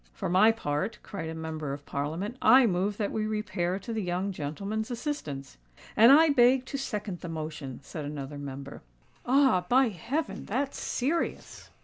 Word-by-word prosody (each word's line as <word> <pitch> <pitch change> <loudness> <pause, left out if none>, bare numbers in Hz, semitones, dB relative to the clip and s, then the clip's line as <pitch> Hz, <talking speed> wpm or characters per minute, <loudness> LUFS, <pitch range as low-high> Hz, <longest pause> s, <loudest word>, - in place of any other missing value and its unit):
"For - - -4
my 190 +5 +6
part," 150 -2 -2
cried 165 -6 -6
a 160 - -5
Member 160 -3 -4
of 145 0 -8
Parliament, 160 - -3
"I 255 +3 +7
move 195 0 0
that 205 -2 -1
we 215 -1 -1
repair 190 -4 -1
to 215 +4 -6
the 220 - -1
young 185 +2 -1
gentleman's 195 - -4
assistance." 225 - -5 0.4
"And 230 +4 +8
I 315 +3 +7
beg 255 -1 +4
to 275 - -4
second 210 -8 -4
the 175 - -7
motion," 155 -5 -6
said 150 +2 -6
another 145 0 -6
Member. 140 0 -7 0.5
"Ah! 260 -8 +4
by 255 0 +5
heaven, 245 - -3
that's 270 +6 -2
serious!" 300 +7 -2
195 Hz, 165 wpm, -28 LUFS, 155-240 Hz, 0.5 s, And